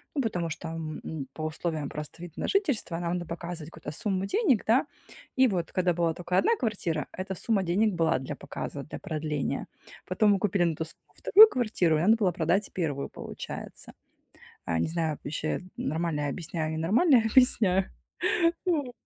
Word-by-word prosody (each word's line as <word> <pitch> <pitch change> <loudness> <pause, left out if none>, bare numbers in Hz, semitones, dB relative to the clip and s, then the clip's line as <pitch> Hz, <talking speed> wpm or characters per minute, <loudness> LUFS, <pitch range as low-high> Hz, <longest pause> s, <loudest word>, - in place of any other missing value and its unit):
Ну, 275 - +2
потому 175 -8 -1
что, 165 +1 -6
м, 155 -3 -5
по 155 - -6
условиям 155 -2 -3
просто 150 +3 -8
вида 175 -3 -8
на - - -1
жительство 285 - 0
нам 170 0 -1
надо 175 -1 -2
показывать 170 -1 -6
какую-то 155 -2 -7
сумму 195 -2 -1
денег, 260 - +2
да. 235 +5 +4 0.5
И 260 - +6
вот 180 -7 -2
когда 180 -1 +2
была 170 -1 +1
тока 175 +2 -2
1 455 +5 +4
квартира, 180 - -1
эта 190 +1 -4
сумма 200 +1 0
денег 195 +4 +2
была 165 -5 +2
для 130 - -5
показа, 140 -1 -6
для - - -8
продления. 155 -5 -3 0.4
Потом 205 +3 +3
мы 195 - +1
купили 195 -2 +1
на 165 - 0
ту 160 - -2
сумму 165 - -19
вторую 435 +2 +8
квартиру, 210 - +1
и 155 - 0
надо 215 +5 +5
было 200 -5 +2
продать 175 +4 0
1, 145 -6 -2
получается. - - -8 0.7
Э, 85 - +1
не - - +1
знаю, 160 -3 -1
ваще 155 +4 -2 0.2
нормально 160 0 -1
я 145 - -1
объясняю 160 0 -3
и - - -2
не - - -3
нормально 245 - +4
я 225 - +3
объясняю. 200 -7 +4 0.8
Вот. 290 -8 0
175 Hz, 185 wpm, -28 LUFS, 160-210 Hz, 0.8 s, вторую